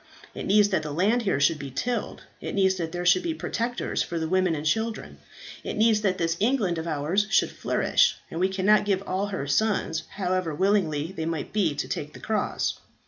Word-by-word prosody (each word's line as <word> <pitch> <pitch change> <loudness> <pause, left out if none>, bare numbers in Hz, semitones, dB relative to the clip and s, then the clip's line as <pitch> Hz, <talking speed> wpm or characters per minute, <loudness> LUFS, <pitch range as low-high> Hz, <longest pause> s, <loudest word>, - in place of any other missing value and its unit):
It - - -6
needs 205 +1 +5
that 190 -5 +1
the 155 - -5
land 200 +10 +2
here 195 -10 0
should 150 +2 +3
be 140 -1 -6
tilled, 235 - -3 0.2
it - - -4
needs 190 -1 +3
that 165 -2 -3
there 175 0 -4
should 360 - +5
be 335 -2 -2
protectors 240 -3 -2
for 170 - -3
the 160 -1 -1
women 185 -1 +2
and 150 0 -5
children, 220 +7 -2 0.4
it - - -4
needs 220 -1 +4
that 190 -3 +1
this 165 0 0
England 210 -7 +1
of 160 - -5
ours 165 +7 0
should 220 - +3
flourish, - - +2 0.2
and 165 - -4
we 185 +2 +2
cannot 195 +2 +3
give 195 -1 0
all 190 +2 -1
her 190 -8 -4
sons, 165 0 +1
however 185 -4 -1
willing 195 0 +2
they 160 +3 -3
might 165 -3 -4
be 185 -8 +1
to - - -3
take 150 0 -4
the - - -11
cross. 215 -1 -1
185 Hz, 210 wpm, -26 LUFS, 160-210 Hz, 0.4 s, needs